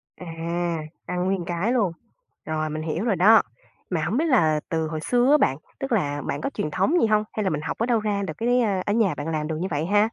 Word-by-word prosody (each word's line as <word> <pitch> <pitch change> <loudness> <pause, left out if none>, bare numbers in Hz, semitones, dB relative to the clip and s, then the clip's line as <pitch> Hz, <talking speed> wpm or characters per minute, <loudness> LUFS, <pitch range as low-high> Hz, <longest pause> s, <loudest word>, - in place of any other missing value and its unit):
À, 180 - -10 0.8
ăn 180 0 -1
nguyên 190 -2 -1
cái 175 +7 -1
luôn. 210 -8 +2 0.5
Rồi, 155 0 -2
mình 155 +1 -4
hiểu 165 +5 -2
rồi 210 -5 +2
đó. 215 +6 +7 0.5
Mà 170 -3 0
hổng 230 - 0
biết 320 - +2
là 160 - +3
từ 160 -2 -1
hồi 155 0 -4
xưa 245 - +2
á 300 - +7
bạn, 135 - +2 0.2
tức 270 - -4
là 145 -10 0
bạn - - -2
có 275 - -1
truyền 150 - -3
thống 195 - +1
gì - - +4
hông? 215 -1 +3
Hay 215 - -1
là 190 - +1
mình 150 -1 -2
học - - -4
ở 230 - +2
đâu 235 -2 +2
ra 205 -2 -1
được 170 -5 -4
cái, 245 +2 +2
a 195 -5 +1
ở 205 - +1
nhà 220 -5 +2
bạn 145 +2 -5
làm 155 -2 -2
được 160 -1 -3
như 190 - -1
vậy 150 +2 -1
ha? 205 +3 +3
190 Hz, 265 wpm, -24 LUFS, 155-225 Hz, 0.8 s, đó